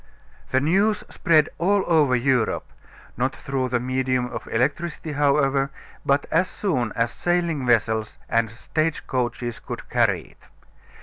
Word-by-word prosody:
The 130 - +3
news 195 +9 +2
spread 155 -2 +3
all 195 +3 +3
over 150 -6 +4
Europe, 125 -2 +1 0.5
not 130 +2 0
through 135 -2 -2
the 125 0 +1
medium 130 0 0
of - - -6
electricity, 150 +6 -1
however, 140 -1 +2 0.3
but 140 +1 +2
as 180 +4 +2
soon 130 - -1
as 115 0 +1
sailing 170 -6 0
vessels 110 -2 +1
and 115 -1 +1
stage 155 +7 -2
coaches 120 -2 -2
could - - -7
carry - - +2
it. - - -21
135 Hz, 135 wpm, -24 LUFS, 125-160 Hz, 0.5 s, over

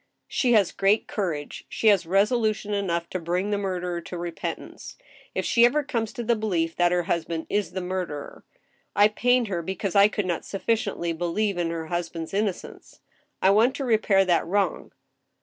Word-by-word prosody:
She 245 -2 +1
has 205 -5 +4
great 200 +3 +2
courage. 165 -8 -3
She 220 - +2
has 195 -5 +3
resolution 210 +2 +1
enough 170 -4 -1
to 185 - -2
bring 180 +4 -1
the 205 - +1
murderer 180 -3 -3
to 175 - -7
repentance 170 -1 -6 0.4
(if - - -1
she 235 - +4
ever 290 +5 +4
comes 230 -5 -2
to 240 -3 -5
the 235 +1 +2
belief 175 -7 -1
that 175 0 +3
her 180 0 +1
husband 165 -1 -2
is 205 -3 -1
the 190 - -3
murderer). 180 -6 -5 0.5
I 205 +1 +6
pained 245 +2 +2
her 175 -3 -2
because 190 +2 -3
I 200 0 +7
could 210 -1 -2
not 175 -2 -1
suffi 200 +3 -1
ciently 180 -6 -2
believe 175 +3 -1
in 170 -1 0
her 165 -1 -4
husband's 170 0 -4
innocence. 200 -2 -4 0.4
I 190 - +6
want 230 +6 +4
to 280 - -3
repair 215 -4 +3
that 175 -2 +2
wrong. 195 -1 -1
195 Hz, 185 wpm, -25 LUFS, 175-215 Hz, 0.5 s, I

